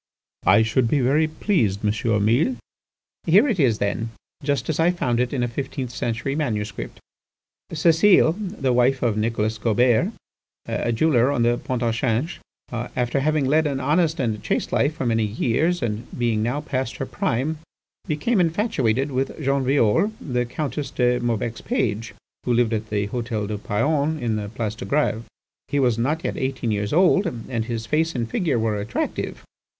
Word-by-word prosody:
"I 110 - +6
should 115 +2 +1
be 145 +5 +2
very 140 +5 +3
pleased, 120 - 0
M. 105 0 +1
Mille." 130 - +2 0.7
"Here 200 - +6
it 220 -9 0
is, 120 -7 +3
then, 110 +3 -1 0.3
just 140 0 -1
as 160 - -1
I 165 +2 +4
found 125 -10 0
it 125 -1 0
in 130 -3 -1
a - - +1
fifteenth 130 +1 -4
century 120 +3 -2
manuscript 105 - -3 0.7
"Cécile, 165 +2 +5 0.3
the 130 -2 +1
wife 125 +2 +2
of 115 -4 +2
Nicolas 110 0 -1
Gaubert, 115 +1 +2 0.5
a 120 - -1
jeweller 125 0 +3
on 125 -5 +1
the 120 +1 +2
Pont 125 -1 -3
au 115 - +2
Change, 120 +6 -1 0.3
after 120 +2 -2
having 150 0 +1
led 155 +3 +3
an 140 -2 -2
honest 160 +4 +1
and 110 -5 -1
chaste - - -1
life 145 +2 +1
for 135 - -3
many 115 -1 +2
years, 130 +10 0
and 110 +1 -3
being 115 -3 +1
now 120 +6 -1
past 130 -5 -3
her 135 - -3
prime, 130 +5 -1 0.5
became 175 +9 +1
infatuated 155 - +1
with 130 +1 -2
Jean 140 -2 +1
Violle, 135 - +3
the 125 -3 -2
Countess 150 +2 -3
de 125 -1 +1
Maubec's 120 -1 -2
page, 110 - -2 0.3
who 125 - +1
lived 120 -1 +2
at 110 0 -3
the 105 -1 -1
Hôtel 115 -3 -3
du 105 -1 -3
Paon 145 +9 0
on 115 -2 0
the 105 -1 -4
Place 110 -1 -3
de 110 - -8
Grève. 115 -3 0 0.4
He 145 - 0
was 120 -4 +2
not 150 +8 0
yet - - -2
eighteen 130 -3 -2
years 105 -1 -1
old, 185 +3 +4
and 120 -5 -4
his 115 -1 -4
face 160 +6 0
and 120 -2 -1
figure 155 - 0
were 110 -2 0
attractive. 105 +2 -3
125 Hz, 175 wpm, -23 LUFS, 115-150 Hz, 0.7 s, I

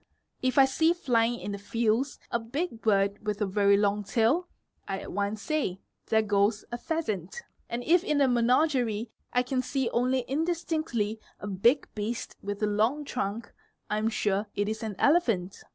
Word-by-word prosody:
If 255 0 0
I 270 - +8
see 320 +5 +3
flying 240 -7 +1
in 205 - -5
the 200 - -5
fields 230 +5 0
a 235 - +1
big 235 +2 -4
bird 200 -1 +2
with 210 -1 -2
a 210 - +1
very 200 +1 +3
long 205 0 +1
tail, 235 - +2 0.4
I 195 - -2
at - - -7
once 205 +2 -2
say 295 - -1 0.3
"there 220 0 +3
goes 205 +1 +1
a 240 - -2
pheasant'; 240 - -3 0.3
and 240 +1 -3
if 345 +5 +4
in 300 -6 +1
a 275 - +5
menagerie 245 -2 +2 0.2
I 250 - +2
can 255 0 -1
see 260 -1 -1
only 255 +2 +2
indistinctly 310 -8 -1 0.2
a - - -7
big 205 +8 +2
beast 220 +3 -4
with 205 +1 -4
a - - +5
long 220 +8 +1
trunk, 230 -3 -4 0.4
[am 215 +1 +1
sure 205 -2 0
it 205 0 0
is 220 0 -3
an 220 -3 -4
elephant. 230 - +2
230 Hz, 175 wpm, -28 LUFS, 205-265 Hz, 0.4 s, I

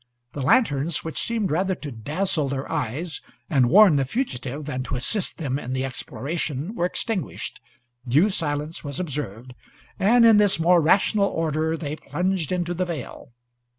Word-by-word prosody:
The 145 - -4
lanterns, 150 - +2
which 160 - -4
seemed 225 -6 -1
rather 185 +4 +1
to 150 -4 -7
dazzle 150 - -1
their 135 0 -3
eyes 150 +8 -3 0.3
and 130 -5 +4
warn 190 -3 +7
the 135 - +2
fugitive 140 - -3
than 130 -3 -3
to 135 - -3
assist 180 - -1
them 140 -4 -2
in 125 -2 -5
the 130 0 -1
exploration, 140 - -4
were 175 -6 0
extinguished, 190 -3 -4 0.5
due 155 - +4
silence 150 -1 -2
was 140 -2 -5
observed, 130 - -5 0.5
and 230 +5 +5
in 225 -2 +7
this 205 -4 +3
more 170 +1 +5
rational 200 +5 +3
order 160 -1 -1
they 150 -1 -4
plunged 180 -2 -2
into 175 -1 -1
the 180 +1 -1
vale. 155 -7 -7
155 Hz, 160 wpm, -24 LUFS, 135-185 Hz, 0.5 s, warn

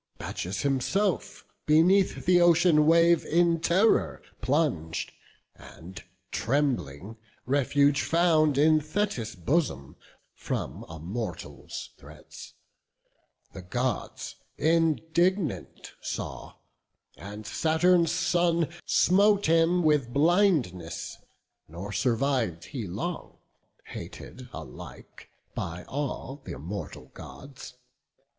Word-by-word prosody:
Bacchus 90 +4 -4
himself 150 +8 -1 0.2
beneath 180 +6 +3
the 180 0 +5
ocean 170 -3 +5
wave 170 0 +5
In 170 0 +2
terror 185 +7 +2 0.2
plung'd, 125 - -1 0.4
and, 90 +3 -12 0.3
trembling, 115 - -1 0.3
refuge 140 +1 +2
found 160 -4 +3
In 155 +2 +5
Thetis' 155 - -2
bosom 95 - -1 0.4
from - - -5
a 80 - -8
mortal's 95 +5 -6
threats: - - -13 1.0
The 95 - -8
Gods 120 +5 -3 0.2
indignant 165 - 0
saw, - - -6 0.6
and 100 +8 -9
Saturn's 165 +3 +2
son 170 -1 +1 0.2
Smote 200 +2 +4
him 165 +2 +3
with 150 -6 +2
blindness; 140 - +1 0.5
nor 90 +6 -8
surviv'd 120 - 0
he 120 -8 -6
long, 115 - -5 0.5
Hated 130 -1 -10
alike 75 -6 -11 0.2
by 85 +1 -5
all 140 -1 -5
th' - - -11
immortal 75 -3 -7
Gods. 135 -2 -11
145 Hz, 90 wpm, -27 LUFS, 105-170 Hz, 1.0 s, the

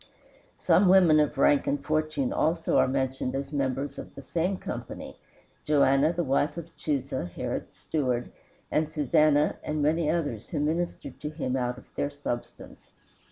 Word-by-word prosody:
Some 200 - +4
women 180 -5 +6
of 150 -1 +1
rank 140 +1 +4
and 145 - -1
fortune 155 -3 0
also 165 +1 +1
are - - +4
mentioned 130 -1 -1
as 140 +2 -4
members 140 0 -2
of - - -10
the 140 - -9
same 180 +6 -1
company: - - -7 0.4
"Joanna 145 0 +4
the 175 0 -1
wife 145 +3 0
of 170 0 -8
Chusa, 135 - -2
Herod's 85 - -5
steward, 125 -6 -2 0.4
and 155 0 +1
Susanna, 150 +1 +3
and 150 -1 -1
many 155 +1 +2
others 145 -10 -2
who 155 - -2
ministered 165 +4 -2
to 150 - -3
him 145 -5 -3
of 125 -1 -2
their 145 - -1
substance." 145 -4 -6
145 Hz, 155 wpm, -27 LUFS, 135-155 Hz, 0.4 s, women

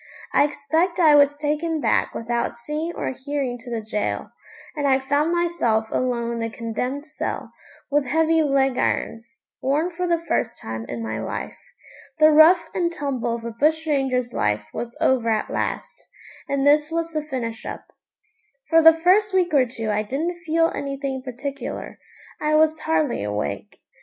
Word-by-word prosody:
I - - +5
expect 320 +5 -1
I 315 -4 +6
was 290 0 +5
taken 305 +2 -1
back - - +1
without 235 +1 -2
seeing 300 +7 -4
or - - -2
hearing 265 -2 -3
to 245 +1 -11
the 230 -2 -3
gaol, 210 -1 -3 0.5
and 290 -2 0
I 265 -1 +4
found 285 +4 0
myself 335 -11 +1
alone 240 -2 -1
in 235 - -4
the 230 0 -2
condemned 250 +5 -4
cell, 310 - -5 0.4
with 290 0 +2
heavy 320 +2 +3
leg 270 -3 +2
irons 230 +1 -2 0.2
worn 295 +7 +1
for 360 +1 -3
the 340 -1 +2
first 325 -8 -2
time 110 0 -6
in 115 -1 -4
my 110 0 -3
life. 110 - -5 0.6
The 310 0 +6
rough 325 +2 +6
and 345 -2 0
tumble 260 -7 -2
of 230 -1 -8
a 235 - -3
bush 310 +7 +1
ranger's 265 -5 0
life 105 0 0
was 240 0 -6
over 245 -3 +2
at 215 -1 0
last, - - -4 0.4
and 275 0 0
this 295 +1 +4
was 330 0 -2
the 305 - 0
finish 245 -6 -5
up. - - -7 0.9
For 325 0 +7
the 325 0 +8
first 395 +3 +4
week 360 -3 +2
or 265 -3 +4
two 225 -2 -4
I 210 0 +1
didn't 325 +10 -3
feel 330 +1 +3
anything 275 -1 -4
particular. 270 +2 -6 0.4
I 305 0 +2
was 315 0 +3
hardly 310 -4 0
awake. 105 -8 -4
280 Hz, 170 wpm, -23 LUFS, 235-315 Hz, 0.9 s, the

